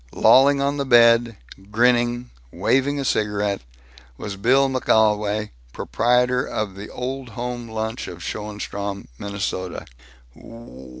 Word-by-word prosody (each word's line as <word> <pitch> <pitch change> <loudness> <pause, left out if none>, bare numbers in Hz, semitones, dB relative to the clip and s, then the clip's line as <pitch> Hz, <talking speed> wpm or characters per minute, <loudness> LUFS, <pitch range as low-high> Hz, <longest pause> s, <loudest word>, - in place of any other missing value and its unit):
Lolling 140 +2 +5
on 140 +1 0
the 140 - -2
bed, 115 -2 +5 0.3
grinning, 120 +2 +1 0.2
waving 140 +2 +1
a 135 - -3
cigarette, 105 -3 0 0.6
was 100 -2 -6
Bill 130 +7 +3
McGolwey, 105 -4 +1 0.2
proprietor 125 +1 +1
of 105 -3 -4
the 100 +2 -9
Old 130 0 -5
Home 120 0 -4
Lunch, 110 +2 -4
of 85 -1 -9
Schoenstrom, 100 -1 -5
Minnesota. 100 -2 -4
115 Hz, 110 wpm, -22 LUFS, 105-125 Hz, 0.6 s, Lolling